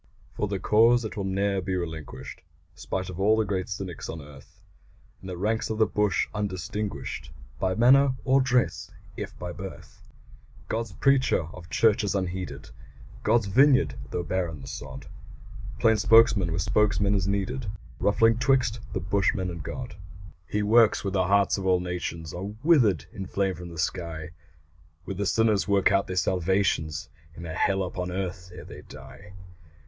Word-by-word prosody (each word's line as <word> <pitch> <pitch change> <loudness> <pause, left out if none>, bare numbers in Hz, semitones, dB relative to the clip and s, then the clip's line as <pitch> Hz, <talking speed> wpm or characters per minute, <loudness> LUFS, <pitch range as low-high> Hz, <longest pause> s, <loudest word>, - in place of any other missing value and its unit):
For 105 - -2
the 100 0 -2
cause 115 +5 +4
that 110 - -5
will 100 - -3
ne'er 100 0 0
be 95 +1 -2
relinquished 80 -6 -6 0.3
Spite 95 -1 -4
of 90 - -9
all 105 +3 +4
the 110 - +2
great 95 -2 -2
cynics 95 -3 -6
on 80 - -5
earth 70 -2 -14 0.6
In 95 - -10
the 90 -1 -5
ranks 110 +5 -1
of 110 - -2
the 110 - +4
bush 105 -5 +1
undistinguished 95 -6 -4 0.3
By 95 -1 0
manner 130 +3 +5
or 135 +1 +4
dress 120 -9 0 0.3
if - - -7
by 90 0 -5
birth 95 +1 -10 0.7
God's 115 0 -3
preacher, 135 -8 +2
of 85 -2 -11
churches 105 -3 +2
unheeded 95 -1 -4 0.5
God's 115 -3 +2
vineyard, 125 - +4 0.2
though 90 - -3
barren 85 -4 -2
the 65 - -10
sod 65 - -8 0.7
Plain 110 -1 +3
spokesman 105 -3 +5
where 80 - -2
spokesman 100 +2 +2
is 95 -3 +1
needed 105 +5 -2 0.3
Rough 100 +2 +1
link 115 0 +5
'twixt 130 -4 +2
the - - -1
bushman 95 0 0
and 85 -2 -6
God. 110 - -7 0.5
He 105 0 -1
works 110 +1 +4
where 100 - -2
the 95 -1 +1
hearts 100 0 +3
of 95 - -3
all 90 -1 +4
nations 90 -3 -5
Are 95 +3 -5
withered 115 - +4
in 95 -1 -6
flame 95 -1 0
from 90 -1 -9
the 85 - -10
sky, 85 -1 -3 0.7
Where 95 - -4
the 100 +1 -2
sinners 110 -1 +2
work 100 -1 +3
out 100 0 +2
their 90 - -4
salvations 90 -5 0 0.3
In 85 - -8
a 80 - -5
hell 95 +3 +1
upon 90 0 -4
earth 90 0 -5
ere 90 - -9
they - - -10
die. 100 0 -13
95 Hz, 170 wpm, -26 LUFS, 90-110 Hz, 0.7 s, manner